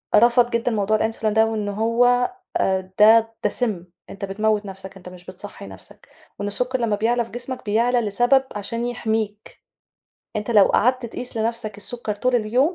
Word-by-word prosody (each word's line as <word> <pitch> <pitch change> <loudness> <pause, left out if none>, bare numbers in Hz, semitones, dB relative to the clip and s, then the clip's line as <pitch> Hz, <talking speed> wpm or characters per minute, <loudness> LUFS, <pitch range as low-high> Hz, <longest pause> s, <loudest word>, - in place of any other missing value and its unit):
رفض 240 +2 +5
جدًا 235 0 0
موضوع 215 0 +1
الInsulin 220 +1 -2
ده 220 0 +5
وإن 215 -2 -2
هو 240 - +2 0.3
آآ 190 -1 0
ده 225 +1 +6
ده - - +3
سِمّ. 210 -8 -1 0.2
أنت 200 0 -6
بتموّت 210 +1 0
نَفْسَك 195 0 -9
أنت 180 -1 -11
مش 180 -1 -14
بتصحّي 185 - -9
نَفْسَك، 95 -1 -10 0.3
وإن 205 - -2
السُكَّر 250 +5 0
لمّا 225 -3 +1
بيعلى 235 +3 +1
في - - -17
جسمك، 250 +2 -6
بيعلى 235 +4 +2
لسبب 245 +5 +3
عشان 230 +4 -3
يحميك. 220 -3 -3 0.8
أنت 210 +2 -3
لو 210 -4 +7
قعدّت 250 +4 +2
تقيس 245 +2 -6
لنَفْسَك 225 -1 -2
السُكَّر 215 +1 -4
طول 250 +5 0
اليوم 245 +9 +2
220 Hz, 170 wpm, -22 LUFS, 205-240 Hz, 0.8 s, لو